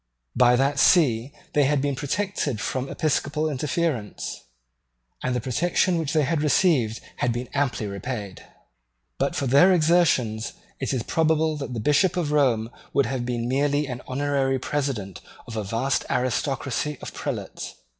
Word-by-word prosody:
By 125 0 +5
that 135 +2 +1
See 130 -8 +4 0.2
they 145 -1 +4
had 145 +1 +2
been 140 0 0
protected 145 - -2
from 130 +5 -2
episcopal 155 0 0
interference; 145 - -2 0.8
and 125 0 -1
the - - +1
protection 165 +8 +1
which 155 -3 -2
they 155 -2 +3
had 155 +2 0
received 145 - +2 0.2
had 125 - +1
been 120 +2 -3
amply 140 -6 0
repaid. 100 0 -5 0.8
But - - 0
for 140 - -1
their 140 +9 +6
exertions 155 -10 +2 0.3
it 130 - -2
is 130 -4 -1
probable 160 +1 +1
that 135 -4 -5
the - - -2
Bishop 150 - +2
of 160 -4 0
Rome 120 -6 +2 0.2
would 140 -1 +3
have 125 -2 -3
been 120 -1 -2
merely 145 +3 +1
the 125 -2 -6
honorary 135 0 0
president 130 - -3 0.2
of 115 - -8
a 110 - -2
vast 115 +6 0
aristocracy 135 +3 -1
of - - -8
prelates. - - -5
135 Hz, 155 wpm, -24 LUFS, 120-150 Hz, 0.8 s, their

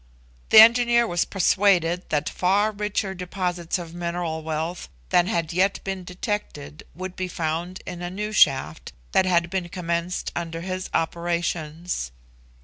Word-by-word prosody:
The - - +6
engineer 235 +1 +7
was 175 -5 0
persuaded 180 -2 +2
that 150 -1 0
far 200 +4 +2
richer 210 -1 -2
deposits 180 -2 -3
of 170 -2 -8
mineral 170 -2 -3
wealth 160 +3 -4 0.2
than 175 0 +4
had 170 -5 -1
yet 195 +3 +2
been 190 -1 -4
detected, 180 -6 -5
would 185 +1 -6
be 185 - -3
found 170 +2 -3
in 175 - -7
a 175 - -3
new 210 +3 -4
shaft 130 - +2 0.2
that 190 - +3
had 170 -1 +2
been 185 -3 -2
commenced 170 0 -3
under 165 -1 -4
his 185 +1 -4
operations. 170 - -2
175 Hz, 140 wpm, -24 LUFS, 170-190 Hz, 0.2 s, engineer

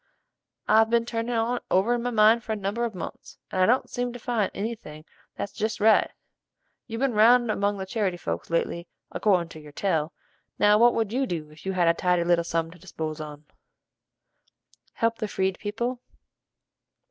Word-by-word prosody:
I've 220 +1 +5
been 230 0 +2
turnin' 235 0 -2
on't 235 +2 0
over 195 +6 +3
in 240 - -1
my 245 - -1
mind 225 0 +4
for 220 - -3
a - - -1
number 205 +4 -2
of 225 -4 -5
months, 180 - -8
and 185 - 0
I 185 - +5
don't 250 +3 +2
seem 245 0 -3
to - - -6
find 235 -4 -1
any 220 +4 -3
thing 155 -8 -12 0.3
that's 200 - -5
jest 220 +1 -2
right. 220 +1 +4 0.8
You've 225 0 -5
ben 270 -3 +1
round 235 +2 +5
among 205 0 0
the 190 - -4
charity 190 -3 -1
folks 85 - -4
lately 170 +1 -1 0.2
accordin' 180 -5 +1
to 160 - -10
your 150 -1 -13
tell, 160 -3 0 0.5
now 210 0 +5
what 240 +1 +5
would 225 -1 -1
you 265 +1 0
do 155 -5 -5
if 155 +5 -12
you 190 - 0
had 175 -2 +2
a 165 - +5
tidy 180 0 +1
little 170 0 +2
sum 165 -1 -2
to 180 - -15
dispose 155 -3 -5
on?" 150 0 -9 1.5
"Help 230 0 0
the 215 - -2
Freed 190 -2 -1
people." 240 +4 -3
205 Hz, 195 wpm, -26 LUFS, 175-230 Hz, 1.5 s, I've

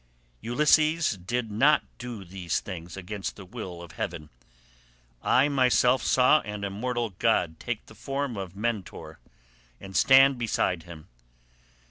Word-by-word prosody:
Ulysses 155 +6 +3
did 110 +5 -3
not 140 +9 +4 0.2
do 120 -5 -7
these 90 -2 -3
things 90 -2 -8
against 95 +1 -5
the 100 - -11
will 90 -4 -8
of 85 - -11
heaven. 80 -3 -5 0.9
I 130 +3 +3
myself 130 -2 +3
saw 130 +4 +4
an 105 -1 -6
immortal 115 +3 -2
god 80 0 +1
take 120 -3 -4
the - - -15
form 135 -2 -4
of 95 -2 -6
Mentor 110 -2 -4 0.6
and 95 0 -10
stand 135 -1 +6
beside 100 -6 0
him. 80 -2 -12
110 Hz, 130 wpm, -27 LUFS, 95-130 Hz, 0.9 s, stand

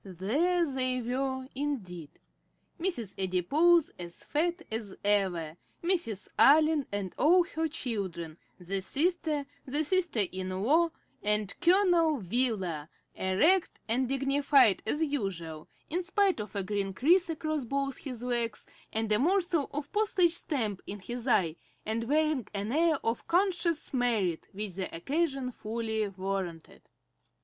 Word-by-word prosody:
There 275 - +1
they 255 -3 -1
were 260 +2 -2
indeed; 200 - -4 0.7
Mrs. 290 - -2
Adipose 285 - +3
as 170 -1 -6
fat 340 +3 -1
as 220 -3 -4
ever, 180 -6 +1 0.3
Mrs. 335 - 0
Allen, 300 +3 +5
and 200 -3 -3
all 350 +5 +6
her 325 -2 -2
children, 190 - -4 0.2
the 190 +2 -3
sister, 305 - 0 0.2
the 290 +4 -1
sister 340 - +1
in 185 0 -4
law, 325 +8 +4 0.3
and 210 -1 0
Colonel 350 -3 +4
Wheeler, 190 - -1 0.2
erect 305 - +2
and 245 +3 +1
dignified 275 -4 +4
as 300 +8 +1
usual, 185 - -3 0.2
in 350 +4 -1
spite 380 - +1
of 210 -1 -6
a 200 - -1
green 195 0 -2
crease 340 - +4
across 310 -2 -2
both 275 +2 -2
his 250 -4 -6
legs, 240 -2 -1 0.3
and 220 0 -1
a 210 - +4
morsel 345 -1 +1
of 290 0 -5
postage 395 -5 +3
stamp 230 - -1
in 205 - -5
his 240 +6 -6
eye, 175 -9 +2 0.3
and 225 +2 -1
wearing 300 -4 +1
an 205 +2 -2
air 320 +3 +3
of 230 +1 -2
conscious 345 -4 +1
merit, 225 -10 0
which 205 -1 -5
the 185 -2 -4
occasion 270 - -1
fully 220 -1 -2
warranted. 190 -4 -5
250 Hz, 135 wpm, -30 LUFS, 200-315 Hz, 0.7 s, all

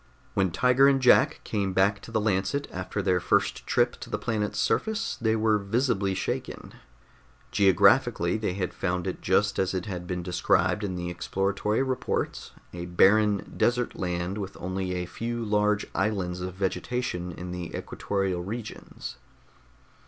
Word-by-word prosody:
When 95 -1 +2
Tiger 125 +9 +4
and 135 -1 +4
Jack 125 -1 +4
came 100 -3 -1
back 100 +2 +2
to - - -11
the 110 - +1
Lancet 105 +7 0
after - - -4
their 90 -1 +2
first - - 0
trip - - +2
to - - -9
the - - -1
planet's 110 -3 -2
surface, 220 0 0
they 110 -1 +2
were 110 -1 +2
visibly 100 -2 0
shaken. - - -4 0.8
Geographically, 95 -2 +4
they 110 -4 -1
had 90 -1 -3
found 90 -2 -2
it - - -4
just - - +2
as 95 0 0
it 90 - -2
had 90 -4 -5
been 90 -1 -3
described 90 +2 +1
in 95 -3 -2
the 90 0 -3
exploratory 100 +6 -1
reports 130 -1 -2 0.2
a 85 0 -5
barren, 100 +3 +3
desert 120 0 +1
land 90 +2 -2
with 100 -1 -6
only 95 0 -3
a 90 0 -2
few 115 +5 -4
large 105 0 +2
islands 90 -4 -1
of 90 0 -5
vegetation 95 -1 -2
in 90 +2 -7
the 90 -2 -5
equatorial 95 -3 -2
regions. 105 - -7
95 Hz, 155 wpm, -27 LUFS, 90-110 Hz, 0.8 s, Tiger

